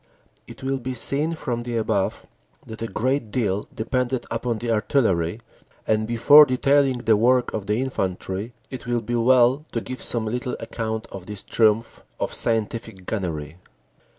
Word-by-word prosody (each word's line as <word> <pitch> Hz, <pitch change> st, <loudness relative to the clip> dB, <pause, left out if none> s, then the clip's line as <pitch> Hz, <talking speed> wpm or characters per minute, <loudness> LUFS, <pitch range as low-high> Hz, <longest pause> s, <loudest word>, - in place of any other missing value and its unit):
It -, -, -12 dB
will 135 Hz, 0 st, -1 dB
be 130 Hz, 0 st, -4 dB
seen 150 Hz, +7 st, +1 dB
from 120 Hz, -6 st, -3 dB
the 120 Hz, -1 st, -3 dB
above 105 Hz, -3 st, -1 dB, 0.4 s
that 110 Hz, 0 st, -9 dB
a 115 Hz, -, -2 dB
great 130 Hz, +1 st, -1 dB
deal 105 Hz, -4 st, -1 dB
depended 125 Hz, +2 st, -1 dB
upon 115 Hz, 0 st, -1 dB
the 115 Hz, +1 st, -2 dB
artillery, 105 Hz, -5 st, +1 dB, 0.4 s
and 110 Hz, 0 st, +1 dB
before 145 Hz, +6 st, +7 dB
detailing 135 Hz, 0 st, +2 dB
the 110 Hz, -, +5 dB
work 125 Hz, +3 st, +3 dB
of 105 Hz, -3 st, -4 dB
the 105 Hz, -, +1 dB
infantry, 95 Hz, -3 st, -3 dB, 0.2 s
it 130 Hz, -2 st, -7 dB
will 120 Hz, -1 st, 0 dB
be 120 Hz, +2 st, -4 dB
well 125 Hz, +3 st, +4 dB
to 115 Hz, -, 0 dB
give 130 Hz, +2 st, -7 dB
some 115 Hz, -2 st, -2 dB
little 125 Hz, +3 st, -3 dB
account 110 Hz, -1 st, -4 dB
of 95 Hz, -2 st, -9 dB
this 105 Hz, -2 st, -6 dB
triumph 110 Hz, 0 st, +1 dB, 0.2 s
of -, -, -2 dB
scientific 110 Hz, -3 st, -2 dB
gunnery. 85 Hz, -6 st, -4 dB
115 Hz, 160 wpm, -23 LUFS, 110-125 Hz, 0.4 s, before